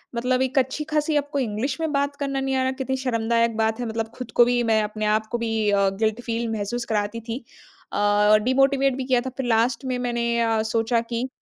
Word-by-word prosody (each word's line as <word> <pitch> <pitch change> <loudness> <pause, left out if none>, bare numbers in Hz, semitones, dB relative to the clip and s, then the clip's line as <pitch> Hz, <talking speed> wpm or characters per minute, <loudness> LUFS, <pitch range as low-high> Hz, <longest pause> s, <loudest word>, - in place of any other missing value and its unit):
मतलब 255 +2 +1
एक 260 +1 -1
अच्छी-खासी 300 +3 -1
आपको 285 0 -1
इंग्लिश 255 +4 -2
में 320 -2 -1
बात 280 0 0
करना 275 -1 -2
नहीं 270 0 -1
आ 260 - +1
रहा, 260 - +1
कितनी 265 0 -3
शर्मदायक 230 -2 0
बात 220 +1 0
है। 245 - -2
मतलब 225 0 -3
खुद 250 -3 -7
को 240 - +5
भी 245 0 +1
मैं 220 -2 +3
अपने 215 0 -3
आप 220 - -7
को 240 - 0
भी 225 -2 0
अ, 200 -1 +3
गिल्ट 220 +1 0
फ़ील 235 -1 -2
महसूस 225 +3 -3
कराती 210 +1 -1
थी। 230 +3 -6 0.5
अ, 205 +1 +4
डिमोटिवेट 270 +1 +3
भी 265 - -2
किया 255 -2 +2
था। 260 - -4
फिर 265 - -2
लास्ट 235 +2 +1
में 255 -1 -1
मैंने 240 -1 -1
अ, 225 -1 +2
सोचा 230 +1 +2
कि 235 +2 -1
240 Hz, 220 wpm, -24 LUFS, 225-265 Hz, 0.5 s, को